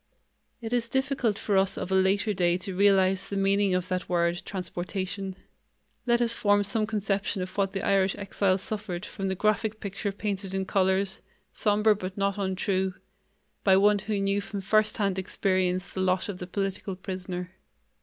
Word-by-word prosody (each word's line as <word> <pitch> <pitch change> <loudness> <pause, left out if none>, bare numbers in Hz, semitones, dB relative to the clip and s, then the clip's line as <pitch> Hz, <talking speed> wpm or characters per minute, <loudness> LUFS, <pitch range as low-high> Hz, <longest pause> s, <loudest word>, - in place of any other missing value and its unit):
It 225 +1 -3
is 235 -1 0
difficult 265 -5 0
for 205 - -1
us 190 0 +2
of 190 - -4
a - - +2
later 195 +3 +3
day 175 -2 +2
to 185 0 -5
realize 195 -1 +3
the 200 - -2
meaning 195 -1 +2
of 185 0 -1
that 185 -1 -2
word, 170 0 +1
transportation. 190 +1 -4 0.7
Let 240 0 +3
us 230 -1 +2
form 205 -2 +3
some 210 +2 -1
conception 200 -3 -1
of 185 - -8
what 195 -1 0
the 195 - -3
Irish 195 -1 +3
exiles 195 -1 0
suffered 205 -4 -4
from 195 -2 -4
the 190 - -1
graphic 215 +2 0
picture 200 0 -3
painted 195 -1 -3
in 190 0 -1
colors, 190 0 +1 0.3
somber 210 0 +3
but 190 -1 -6
not 200 0 0
untrue, 190 -1 0 0.7
by 190 -2 +6
one 205 +1 +4
who 210 +1 -2
knew 195 +1 +1
from 200 -1 -5
firsthand 210 -1 +2
experience 185 -1 0
the 190 - -2
lot 185 +1 +1
of 185 -3 -5
the 180 - -6
political 195 0 -3
prisoner. 180 -1 -5
195 Hz, 175 wpm, -27 LUFS, 185-205 Hz, 0.7 s, by